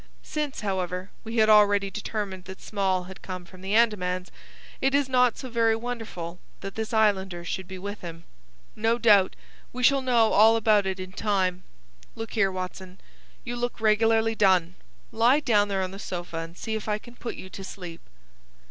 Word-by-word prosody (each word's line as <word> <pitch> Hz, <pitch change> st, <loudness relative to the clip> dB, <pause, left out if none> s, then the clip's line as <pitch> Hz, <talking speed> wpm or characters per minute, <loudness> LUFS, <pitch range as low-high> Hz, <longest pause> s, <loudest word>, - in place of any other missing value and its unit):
Since, 300 Hz, -4 st, -3 dB
however, 185 Hz, -2 st, -3 dB
we 230 Hz, +1 st, -5 dB
had 220 Hz, -1 st, +5 dB
already 205 Hz, -2 st, +5 dB
determined 200 Hz, -3 st, -4 dB
that 190 Hz, 0 st, -9 dB
Small 190 Hz, -3 st, -1 dB
had 190 Hz, +1 st, -11 dB
come 185 Hz, -1 st, -7 dB
from 185 Hz, +1 st, -15 dB
the 195 Hz, +2 st, -1 dB
Andamans, 185 Hz, -5 st, +1 dB, 0.5 s
it 270 Hz, +1 st, +2 dB
is 285 Hz, -2 st, +2 dB
not 250 Hz, -2 st, +3 dB
so 260 Hz, -, -6 dB
very 230 Hz, -2 st, +2 dB
wonderful 225 Hz, -8 st, -6 dB, 0.2 s
that 195 Hz, 0 st, -6 dB
this 220 Hz, -1 st, -4 dB
islander 190 Hz, -5 st, +1 dB
should 190 Hz, +1 st, -4 dB
be 190 Hz, -, -7 dB
with 205 Hz, +2 st, -6 dB
him. 165 Hz, -1 st, -8 dB, 0.5 s
No 225 Hz, +2 st, +1 dB
doubt 210 Hz, -5 st, +5 dB, 0.4 s
we 250 Hz, +1 st, -5 dB
shall 275 Hz, +1 st, +5 dB
know 240 Hz, -4 st, +3 dB
all 220 Hz, +2 st, +7 dB
about 215 Hz, -3 st, +3 dB
it 190 Hz, 0 st, -2 dB
in 185 Hz, 0 st, -6 dB
time. 185 Hz, -3 st, 0 dB, 0.5 s
Look 225 Hz, 0 st, -6 dB
here, 195 Hz, -4 st, +2 dB
Watson; 185 Hz, 0 st, -6 dB, 0.4 s
you 245 Hz, 0 st, -4 dB
look 245 Hz, 0 st, -3 dB
regularly 225 Hz, +1 st, +3 dB
done. 185 Hz, -5 st, +3 dB, 0.4 s
Lie 240 Hz, +6 st, +4 dB
down 210 Hz, -7 st, +3 dB
there 195 Hz, -1 st, -1 dB
on 185 Hz, -, -4 dB
the 195 Hz, -, -9 dB
sofa, 175 Hz, -4 st, -5 dB
and 165 Hz, +1 st, -6 dB
see 220 Hz, -, -4 dB
if 220 Hz, 0 st, -3 dB
I 210 Hz, -, +1 dB
can 240 Hz, +3 st, -14 dB
put 240 Hz, -, -6 dB
you -, -, -9 dB
to 195 Hz, -, -8 dB
sleep." 180 Hz, -3 st, -8 dB
205 Hz, 185 wpm, -26 LUFS, 185-225 Hz, 0.5 s, all